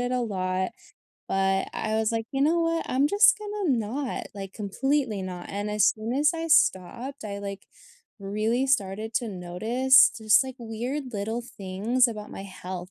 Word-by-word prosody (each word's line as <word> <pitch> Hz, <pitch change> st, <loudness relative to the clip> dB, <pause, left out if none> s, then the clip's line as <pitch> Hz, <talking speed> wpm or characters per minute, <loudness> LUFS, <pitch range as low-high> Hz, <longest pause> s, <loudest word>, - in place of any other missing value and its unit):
it 245 Hz, 0 st, -1 dB
a 250 Hz, 0 st, 0 dB
lot, 185 Hz, -4 st, -1 dB, 0.6 s
but 195 Hz, 0 st, +1 dB
I 215 Hz, 0 st, -2 dB
was, 220 Hz, 0 st, +1 dB
like, 225 Hz, -1 st, -2 dB
"You 270 Hz, -, -2 dB
know 320 Hz, +4 st, +3 dB
what? 330 Hz, 0 st, 0 dB
I'm 270 Hz, +3 st, +2 dB
just 405 Hz, +6 st, +6 dB
gonna 415 Hz, -4 st, -3 dB
not," 245 Hz, +5 st, -3 dB
like, 195 Hz, -1 st, -7 dB
completely 230 Hz, +2 st, -1 dB
not, 180 Hz, -1 st, -6 dB
and 205 Hz, +1 st, -3 dB
as 210 Hz, 0 st, +3 dB
soon 220 Hz, +2 st, 0 dB
as 295 Hz, +2 st, +3 dB
I 330 Hz, 0 st, -4 dB
stopped, 250 Hz, -, +1 dB
I, 200 Hz, -1 st, -5 dB
like, 200 Hz, -1 st, -7 dB, 0.5 s
really 215 Hz, +6 st, 0 dB
started 215 Hz, -3 st, 0 dB
to 235 Hz, -1 st, 0 dB
notice 220 Hz, +9 st, +4 dB
just, 220 Hz, +1 st, +4 dB
like, 260 Hz, -1 st, -7 dB
weird 245 Hz, +4 st, -4 dB
little 220 Hz, +3 st, -2 dB
things 225 Hz, +3 st, 0 dB
about 215 Hz, -2 st, -6 dB
my 195 Hz, -, -7 dB
health 185 Hz, -1 st, -7 dB
220 Hz, 170 wpm, -26 LUFS, 195-265 Hz, 0.6 s, just